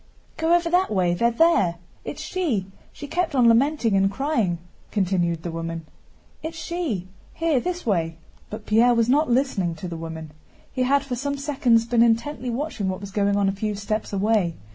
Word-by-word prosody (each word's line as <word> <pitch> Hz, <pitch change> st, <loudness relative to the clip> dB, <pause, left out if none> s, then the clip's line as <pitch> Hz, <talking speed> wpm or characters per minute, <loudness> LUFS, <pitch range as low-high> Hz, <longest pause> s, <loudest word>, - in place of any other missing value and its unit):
"Go 325 Hz, +2 st, +3 dB
over 345 Hz, -1 st, +1 dB
that 360 Hz, +2 st, +2 dB
way, 185 Hz, -4 st, +1 dB
they're 235 Hz, +7 st, +2 dB
there. 235 Hz, -, +3 dB, 0.3 s
It's -, -, -6 dB
she! 295 Hz, -, -1 dB, 0.3 s
She 290 Hz, -, -9 dB
kept 330 Hz, 0 st, -1 dB
on 245 Hz, -3 st, +5 dB
lamenting 235 Hz, -1 st, +3 dB
and 195 Hz, 0 st, +3 dB
crying," 225 Hz, -, 0 dB, 0.3 s
continued 175 Hz, -5 st, 0 dB
the 170 Hz, -, -4 dB
woman. 165 Hz, 0 st, -5 dB, 0.6 s
"It's 320 Hz, +1 st, -6 dB
she. 315 Hz, -, -3 dB, 0.3 s
Here, 325 Hz, -5 st, +1 dB
this 355 Hz, +6 st, -4 dB
way!" 165 Hz, -6 st, 0 dB, 0.3 s
But 215 Hz, 0 st, -8 dB
Pierre 235 Hz, +3 st, +4 dB
was 230 Hz, 0 st, +2 dB
not 295 Hz, +3 st, +3 dB
listening 235 Hz, -9 st, +1 dB
to 170 Hz, +3 st, -7 dB
the 170 Hz, -1 st, -5 dB
woman. 160 Hz, -1 st, -7 dB, 0.4 s
He 255 Hz, -, -2 dB
had 275 Hz, +2 st, +3 dB
for 265 Hz, -3 st, -4 dB
some 280 Hz, +3 st, -3 dB
seconds 265 Hz, -5 st, +2 dB
been 235 Hz, 0 st, +2 dB
intently 240 Hz, +3 st, +1 dB
watching 240 Hz, -5 st, -2 dB
what 185 Hz, -, -3 dB
was 200 Hz, -1 st, -8 dB
going 200 Hz, 0 st, +1 dB
on 200 Hz, -1 st, +2 dB
a -, -, +2 dB
few 210 Hz, +2 st, -3 dB
steps 215 Hz, +2 st, -3 dB
away. 200 Hz, -4 st, +1 dB
230 Hz, 185 wpm, -24 LUFS, 190-280 Hz, 0.6 s, on